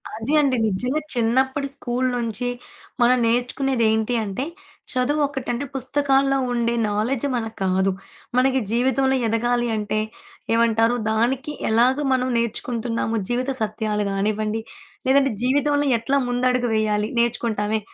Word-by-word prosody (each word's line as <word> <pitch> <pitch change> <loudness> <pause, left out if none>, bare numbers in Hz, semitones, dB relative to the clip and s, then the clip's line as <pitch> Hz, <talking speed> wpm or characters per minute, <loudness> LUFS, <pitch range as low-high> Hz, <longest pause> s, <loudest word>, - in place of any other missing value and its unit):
అది 225 +7 -3
అండి. 275 -3 +2
నిజ్జంగా 250 +9 -1
చిన్నప్పటి 260 +4 +1
స్కూల్ 255 -1 -1
నుంచి 235 0 -2 0.5
మనం 245 +1 +5
నేర్చుకునేదేంటి 240 -2 +1
అంటే, 205 +6 -3 0.5
చదువు 275 +4 +1
ఒకటి. 270 -3 -6
అంటే, 245 +4 -3
పుస్తకాల్లో 275 0 +2
ఉండే 235 -1 0 0.2
నాలెడ్జ్ 230 +6 -1
మనకి 225 -2 -4
కాదు. 190 +1 +2 0.5
మనకి 265 +1 +3
జీవితంలో 265 +3 +2
ఎదగాలి 240 +2 +1
అంటే, 215 0 -1 0.5
ఏమంటారు? 230 0 +3 0.2
దానికి 265 +7 0 0.2
ఎలాగా 250 +6 +3
మనం 255 0 +1
నేర్చుకుంటున్నాము? 230 0 -2
జీవిత 250 +2 -1
సత్యాలు 215 -1 -1
గానివ్వండి, 215 +2 -1 0.5
లేదంటే 270 0 +4
జీవితంలో 285 +3 +2
ఎట్లా 265 +5 0
ముందడుగు 245 0 +1
వేయాలి 215 -1 +1
నేర్చుకుంటామే, 220 -2 0
240 Hz, 115 wpm, -22 LUFS, 220-265 Hz, 0.5 s, మనం